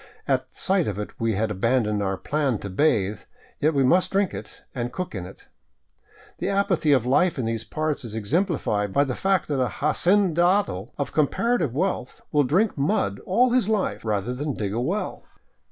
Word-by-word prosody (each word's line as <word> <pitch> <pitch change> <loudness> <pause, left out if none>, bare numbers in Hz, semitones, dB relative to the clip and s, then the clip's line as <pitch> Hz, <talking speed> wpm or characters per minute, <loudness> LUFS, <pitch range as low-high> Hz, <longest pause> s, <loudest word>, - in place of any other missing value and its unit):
At - - 0
sight 190 -3 +1
of 100 - -3
it 105 - -5
we 115 -1 +1
had 105 +2 0
abandoned 105 0 +1
our 95 -1 -1
plan 140 +3 0
to 100 - -6
bathe, 105 -4 +1 0.4
yet 155 +1 +2
we 135 - +3
must 175 +8 +3
drink 195 -1 +1
it - - -9
and 120 -1 -3
cook 180 +7 -5
in 90 -4 -5
it. 95 - -14 0.9
The - - -1
apathy 195 -6 +1
of 130 -4 +3
life 165 +7 +2
in 125 - -1
these 115 0 -2
parts 155 +6 -2
is 110 -2 -7
ex 110 0 -5
emplified 140 - 0
by 140 - +4
the 135 -3 -2
fact 190 +5 +1
that 140 -3 0
an 125 - -1
hacendado 175 - +2
of 140 -5 -2
comparative 155 - +1
wealth 180 -5 -2
will 145 -1 +4
drink 185 - +2
mud 100 -8 0
all 240 +7 +3
his 245 -4 +2
life, 215 -3 0
rather 110 +2 -1
than 140 +1 -3
dig 100 -2 -3
a 115 - -1
well. 185 +11 -2
140 Hz, 190 wpm, -24 LUFS, 110-180 Hz, 0.9 s, by